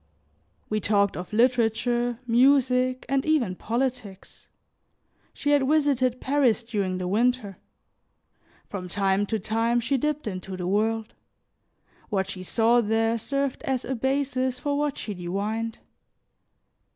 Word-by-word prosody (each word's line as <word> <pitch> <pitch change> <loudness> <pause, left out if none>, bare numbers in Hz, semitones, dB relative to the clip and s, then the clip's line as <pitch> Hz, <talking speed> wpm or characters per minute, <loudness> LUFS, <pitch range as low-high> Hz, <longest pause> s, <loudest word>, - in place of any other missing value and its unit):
We 215 - -1
talked 200 -1 +2
of 180 - -6
literature, 240 +1 +2
music, 255 +1 +3
and 270 -1 +1
even 295 -12 +1
politics. 235 -3 -4 0.8
She 290 - -2
had 285 -2 +3
visited 270 -5 +2
Paris 260 -5 +2
during 200 -5 -2
the 180 -1 -3
winter; 220 0 0 1.1
from 180 -3 -6
time 195 +2 +1
to 220 - 0
time, 225 +3 0
she 250 +4 0
dipped 300 +3 -1
into 185 -2 -5
the 180 - -4
world; 220 +3 0 1.0
what 190 -2 0
she 185 - -7
saw 230 +5 +3
there 225 +1 +1
served 275 +3 -2
as 260 -2 -2
a 265 - -2
basis 260 0 -1
for 285 +3 -2
what 290 -1 -1
she 210 - -4
divined. 205 +5 -3
235 Hz, 125 wpm, -26 LUFS, 205-260 Hz, 1.1 s, music